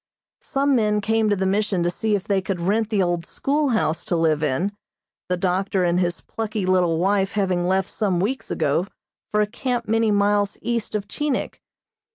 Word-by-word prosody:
Some 275 Hz, 0 st, +1 dB
men 210 Hz, -3 st, +2 dB
came 220 Hz, +1 st, +1 dB
to 205 Hz, -, +3 dB
the 190 Hz, 0 st, -1 dB
Mission 195 Hz, -2 st, +1 dB
to 175 Hz, -, +1 dB
see 215 Hz, +3 st, 0 dB
if 195 Hz, -, -2 dB
they 200 Hz, -2 st, +1 dB
could 190 Hz, -1 st, -3 dB
rent 210 Hz, +5 st, +1 dB
the 205 Hz, -4 st, +2 dB
old 175 Hz, -1 st, -1 dB
schoolhouse 270 Hz, -, 0 dB
to -, -, 0 dB
live 160 Hz, -2 st, +2 dB
in, 150 Hz, +7 st, 0 dB, 0.6 s
the 180 Hz, -, +1 dB
doctor 190 Hz, +1 st, 0 dB
and 175 Hz, 0 st, +2 dB
his 175 Hz, -1 st, -1 dB
plucky 215 Hz, -3 st, -3 dB
little 180 Hz, -3 st, +2 dB
wife 195 Hz, +2 st, +1 dB
having 185 Hz, -4 st, 0 dB
left 190 Hz, +1 st, +1 dB
some 195 Hz, -6 st, -1 dB
weeks 230 Hz, +9 st, -2 dB
ago 160 Hz, +4 st, 0 dB, 0.4 s
for 210 Hz, -, +2 dB
a -, -, +3 dB
camp 240 Hz, +2 st, -3 dB
many 225 Hz, 0 st, +2 dB
miles 205 Hz, 0 st, +2 dB
east 230 Hz, -2 st, -2 dB
of 205 Hz, -1 st, -2 dB
Chinik. 295 Hz, +3 st, -2 dB
200 Hz, 190 wpm, -23 LUFS, 180-220 Hz, 0.6 s, to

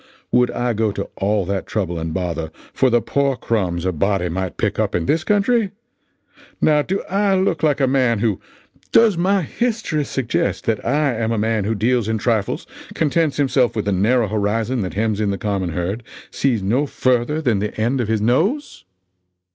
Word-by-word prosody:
Would 125 Hz, 0 st, +4 dB
I 120 Hz, -1 st, -1 dB
go 110 Hz, -1 st, 0 dB
to 100 Hz, -1 st, -4 dB
all 100 Hz, 0 st, +1 dB
that 95 Hz, +1 st, -3 dB
trouble 90 Hz, -5 st, -2 dB
and 80 Hz, 0 st, -3 dB
bother 85 Hz, -2 st, -3 dB, 0.2 s
for 130 Hz, -, +3 dB
the 120 Hz, -2 st, +2 dB
poor 140 Hz, +2 st, +1 dB
crumbs 95 Hz, -8 st, -1 dB
a 95 Hz, -, +1 dB
body 95 Hz, +2 st, 0 dB
might 95 Hz, +1 st, -3 dB
pick -, -, -1 dB
up -, -, 0 dB
in 85 Hz, -, 0 dB
this 155 Hz, -, +1 dB
country? 210 Hz, +3 st, +2 dB, 0.9 s
Now 150 Hz, -1 st, +4 dB
do 190 Hz, +6 st, -2 dB
I 200 Hz, +1 st, +1 dB
look 185 Hz, -5 st, +1 dB
like 150 Hz, -2 st, +2 dB
a 135 Hz, -, +3 dB
man 130 Hz, -3 st, +2 dB
who 105 Hz, -2 st, 0 dB, 0.5 s
does 225 Hz, -4 st, +5 dB
my 190 Hz, +2 st, +2 dB
history 220 Hz, -, -1 dB
suggest 115 Hz, -8 st, -2 dB
that 115 Hz, -2 st, 0 dB
I 140 Hz, +2 st, +1 dB
am 115 Hz, 0 st, -1 dB
a 115 Hz, -, 0 dB
man 110 Hz, -1 st, 0 dB
who 110 Hz, +2 st, 0 dB
deals 115 Hz, +1 st, +1 dB
in 110 Hz, 0 st, 0 dB
trifles, 110 Hz, -2 st, -1 dB, 0.3 s
contents 160 Hz, -1 st, +1 dB
himself 130 Hz, -3 st, +2 dB
with 110 Hz, -, -2 dB
the 100 Hz, -, 0 dB
narrow 110 Hz, +5 st, +2 dB
horizon 110 Hz, +4 st, -1 dB
that 95 Hz, -1 st, -4 dB
hems 110 Hz, 0 st, 0 dB
in 105 Hz, -, +1 dB
the 100 Hz, -, -1 dB
common 100 Hz, -4 st, -2 dB
herd, 90 Hz, +6 st, -3 dB, 0.3 s
sees 120 Hz, -7 st, 0 dB
no 125 Hz, +9 st, +1 dB
further 130 Hz, +4 st, +1 dB
than 120 Hz, -10 st, +1 dB
the 105 Hz, +2 st, -4 dB
end 120 Hz, +4 st, +1 dB
of 115 Hz, -, -2 dB
his 110 Hz, -1 st, 0 dB
nose? 180 Hz, -, 0 dB
115 Hz, 195 wpm, -20 LUFS, 100-145 Hz, 0.9 s, does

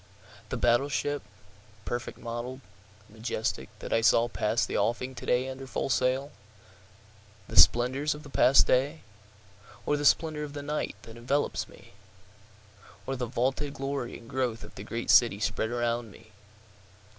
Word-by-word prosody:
The -, -, -2 dB
battle 120 Hz, +4 st, +3 dB
ship, 145 Hz, 0 st, -1 dB, 0.6 s
perfect 120 Hz, 0 st, -4 dB
model'd, 120 Hz, +2 st, -6 dB, 0.5 s
majestic, 110 Hz, 0 st, -3 dB
that -, -, -5 dB
I 115 Hz, -, +3 dB
saw 115 Hz, +1 st, +4 dB
pass 115 Hz, 0 st, 0 dB
the -, -, -5 dB
offing 125 Hz, +2 st, 0 dB
to -, -, -9 dB
day 125 Hz, +1 st, +2 dB
under 135 Hz, 0 st, -7 dB
full 135 Hz, -, -2 dB
sail? 130 Hz, +3 st, +1 dB, 1.2 s
The -, -, -8 dB
splendors 130 Hz, +5 st, +5 dB
of 150 Hz, -, -11 dB
the 145 Hz, -, -11 dB
past 135 Hz, 0 st, +6 dB
day? 140 Hz, +5 st, +1 dB, 0.8 s
Or 145 Hz, -, +1 dB
the 145 Hz, -, -3 dB
splendor 155 Hz, +1 st, +3 dB
of 145 Hz, -1 st, -7 dB
the 145 Hz, -1 st, -6 dB
night 150 Hz, +1 st, -2 dB
that 115 Hz, 0 st, -11 dB
envelopes 135 Hz, +5 st, -1 dB
me? -, -, -16 dB, 1.1 s
Or 135 Hz, -, -2 dB
the 125 Hz, -1 st, -3 dB
vaunted 135 Hz, +4 st, -1 dB
glory 135 Hz, -2 st, -3 dB
and 115 Hz, -, -15 dB
growth 125 Hz, -3 st, -2 dB
of -, -, -12 dB
the -, -, -9 dB
great 115 Hz, +1 st, -2 dB
city 115 Hz, -5 st, +5 dB
spread 110 Hz, +1 st, -1 dB
around 120 Hz, -1 st, -1 dB
me? 110 Hz, +2 st, -17 dB
125 Hz, 155 wpm, -28 LUFS, 120-140 Hz, 1.2 s, past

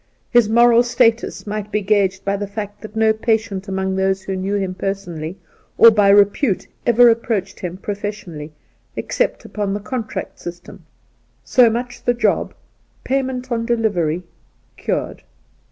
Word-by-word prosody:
His 240 Hz, -3 st, +4 dB
moral 235 Hz, +1 st, +6 dB
status 235 Hz, -1 st, +1 dB
might 210 Hz, 0 st, -5 dB
be 210 Hz, -, 0 dB
gauged 195 Hz, -2 st, +1 dB
by 200 Hz, 0 st, +1 dB
the 205 Hz, 0 st, -4 dB
fact 205 Hz, 0 st, -7 dB
that 215 Hz, 0 st, -10 dB
no 220 Hz, 0 st, +3 dB
patient 220 Hz, -3 st, -1 dB
among 190 Hz, 0 st, -2 dB
those 190 Hz, 0 st, 0 dB
who 190 Hz, 0 st, -3 dB
knew 190 Hz, +2 st, -2 dB
him 190 Hz, -2 st, -1 dB
personally 185 Hz, -3 st, -4 dB, 0.4 s
or 230 Hz, -, +9 dB
by 205 Hz, -2 st, +3 dB
re 200 Hz, 0 st, +8 dB
pute 205 Hz, 0 st, -2 dB, 0.2 s
ever 240 Hz, +1 st, +6 dB
approached 225 Hz, -4 st, -1 dB
him 180 Hz, 0 st, -5 dB
professionally 200 Hz, -7 st, -6 dB, 0.4 s
except -, -, -2 dB
upon 205 Hz, -2 st, -3 dB
the -, -, -3 dB
contract 220 Hz, +2 st, -5 dB
system 175 Hz, 0 st, -10 dB, 0.3 s
— -, -, -41 dB
so 245 Hz, -2 st, +5 dB
much 245 Hz, +2 st, -4 dB
the 245 Hz, -, +1 dB
job, 240 Hz, -, 0 dB, 0.5 s
pay 270 Hz, +1 st, +1 dB
ment 255 Hz, -1 st, -5 dB
on 230 Hz, -1 st, 0 dB
delivery, 200 Hz, -8 st, 0 dB, 0.5 s
cured. -, -, -3 dB
205 Hz, 155 wpm, -19 LUFS, 190-230 Hz, 0.5 s, or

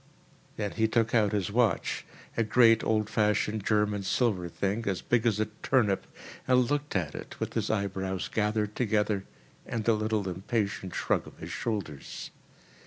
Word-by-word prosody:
Then 105 Hz, -2 st, -2 dB
he 110 Hz, -1 st, +1 dB
took 115 Hz, 0 st, +1 dB
out 105 Hz, -4 st, +4 dB
his 100 Hz, -1 st, -1 dB
watch, 115 Hz, 0 st, +1 dB, 0.3 s
a -, -, +1 dB
great, 115 Hz, 0 st, +5 dB
old 110 Hz, -1 st, +1 dB
fashioned 105 Hz, -1 st, +1 dB
German 105 Hz, -1 st, +1 dB
silver 95 Hz, -3 st, +1 dB
thing 100 Hz, +6 st, -2 dB
as 95 Hz, -3 st, 0 dB
big 120 Hz, -1 st, +2 dB
as 105 Hz, -2 st, +2 dB
a 110 Hz, -, +2 dB, 0.2 s
turnip, 110 Hz, -8 st, +2 dB, 0.4 s
and 125 Hz, 0 st, +4 dB
looked 145 Hz, -3 st, -1 dB
at 80 Hz, -6 st, 0 dB
it, -, -, -8 dB
with -, -, -3 dB
his -, -, -1 dB
eyebrows 95 Hz, -3 st, -1 dB
gathered 105 Hz, -1 st, 0 dB
together 105 Hz, -4 st, +1 dB, 0.4 s
and 115 Hz, -3 st, -4 dB
a 115 Hz, -, +6 dB
little 110 Hz, -2 st, 0 dB
impatient 95 Hz, 0 st, -2 dB
shrug -, -, 0 dB
of -, -, -13 dB
his -, -, -7 dB
shoulders. 95 Hz, -11 st, -4 dB
105 Hz, 165 wpm, -29 LUFS, 100-115 Hz, 0.4 s, a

